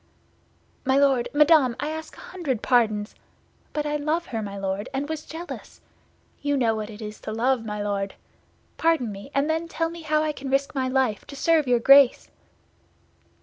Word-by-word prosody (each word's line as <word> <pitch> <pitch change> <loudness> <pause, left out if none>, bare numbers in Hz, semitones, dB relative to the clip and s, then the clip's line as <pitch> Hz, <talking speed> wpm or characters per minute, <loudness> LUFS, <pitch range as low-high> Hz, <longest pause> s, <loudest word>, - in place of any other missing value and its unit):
"My 265 0 +2
Lord, 275 -4 +3
Madame, 295 -4 +5
I 295 +3 -2
ask 315 0 -7
a - - -11
hundred 290 - -4
pardons! 215 -4 +2 0.6
But 300 -1 -2
I 295 0 0
love 310 +4 -1
her, 225 -2 -4
my 200 -1 -6
Lord, 195 +4 -3
and 280 +2 -2
was 310 -1 -5
jealous. 335 +2 -8 0.6
You 285 -1 0
know 235 -4 +2
what 215 -1 -4
it 215 0 -9
is 210 0 -8
to - - -5
love, 240 +2 +1
my 210 -1 -4
Lord. 200 -1 -2 0.6
Pardon 320 -9 +1
me, 200 +5 -9
and 280 +1 +2
then 320 +1 -1
tell 330 0 -2
me 340 0 -9
how 310 -1 +1
I 310 - 0
can 275 -2 -7
risk 275 +1 0
my 260 -2 -1
life 255 -5 0
to 280 - -9
serve 315 0 +2
your 245 -1 +4
Grace?" 275 +1 +6
270 Hz, 190 wpm, -25 LUFS, 220-305 Hz, 0.6 s, Grace